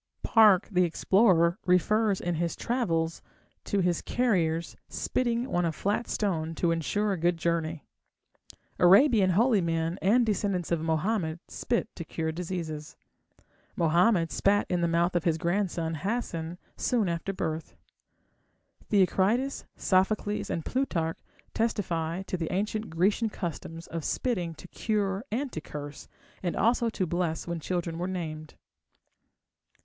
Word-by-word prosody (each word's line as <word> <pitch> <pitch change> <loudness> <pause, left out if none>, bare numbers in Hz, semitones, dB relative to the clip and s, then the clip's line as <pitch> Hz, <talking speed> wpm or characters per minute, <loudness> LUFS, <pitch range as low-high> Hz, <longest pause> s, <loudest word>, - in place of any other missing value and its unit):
Park, 210 -4 +5
the 180 -1 +3
explorer, 175 0 +3
refers 200 +3 +3
in 175 - -2
his 170 +1 -1
Travels 165 -10 -1 0.4
to 200 - +1
his 175 -2 +1
carriers 170 -9 0
spitting 240 -1 -1
on 175 - +2
a 165 - +1
flat 205 +8 -1
stone 165 -6 -1
to 170 0 +1
ensure 205 +6 0
a 185 - -4
good 175 +1 +2
journey. 165 -1 -1 1.0
Arabian 200 +2 +6
holy 215 +3 +3
men 165 +1 -1
and 235 +6 +4
descendants 200 -5 -1
of 170 -2 +1
Mohammed 160 +1 0
spit 235 -2 -1
to 170 - -5
cure 160 0 -3
diseases. 160 -3 -5 0.8
Mohammed 170 +1 +3
spat 205 +1 +2
in 175 -1 +1
the 170 - +2
mouth 170 +2 +1
of 175 - +1
his 165 -2 +2
grandson 170 -2 -1
Hasen 175 -2 -3 0.2
soon 235 -6 +1
after 170 +3 -2
birth. 160 -4 -4 1.1
Theocritus, 210 +7 +2
Sophocles, 205 +2 +1
and 165 - -3
Plutarch 170 -12 -1 0.3
testify 180 -6 -1
to 185 - -3
the 165 -2 -3
ancient 210 +3 -2
Grecian 195 +7 +1
customs 170 -3 -6
of 165 -1 -5
spitting 180 - -1
to 180 - -12
cure 205 -2 -1
and 260 +4 -2
to 155 - -5
curse, 145 -1 -8 0.3
and 175 -2 -2
also 235 +2 +2
to 195 -4 -2
bless 170 -1 -1
when 170 -1 -3
children 170 0 -3
were 180 - -1
named. 155 -4 -5
180 Hz, 135 wpm, -28 LUFS, 165-210 Hz, 1.1 s, Arabian